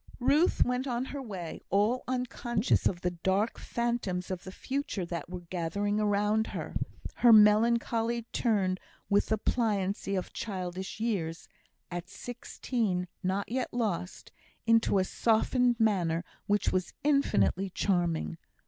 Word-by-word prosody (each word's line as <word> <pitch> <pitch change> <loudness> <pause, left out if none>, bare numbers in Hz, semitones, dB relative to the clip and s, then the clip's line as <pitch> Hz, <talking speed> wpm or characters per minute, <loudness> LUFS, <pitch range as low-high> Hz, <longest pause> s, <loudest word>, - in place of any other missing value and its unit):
Ruth 290 +7 +4
went 250 +2 -1
on 245 0 -1
her 280 +1 -5
way, 190 -9 -6
all 210 +6 +2
unconscious 250 -2 0
of 175 -2 -2
the 180 - 0
dark 190 +5 0
phantoms 235 -7 -2
of 185 -1 -5
the 185 - -6
future 260 -4 -3
that 170 0 -5
were 180 0 -6
gathering 185 +4 -1
around 210 +1 +2
her; - - -5 0.4
her 240 - +6
melancholy 230 +2 +4
turned, 195 -5 +1 0.3
with 200 - +4
the 220 - +1
pliancy 200 -3 0
of 185 - -3
childish 190 -2 -4
years, 180 -8 -2 0.4
at 175 0 -5
sixteen 225 -6 -3
not 190 +3 -1
yet 255 +1 -1
lost, 205 -7 -3 0.3
into 230 -3 +4
a 190 - +4
softened 240 +4 +2
manner 175 -7 +2 0.2
which 205 0 +2
was 185 -1 -1
infinitely 195 - +2
charming. 170 - 0
205 Hz, 130 wpm, -30 LUFS, 185-235 Hz, 0.4 s, her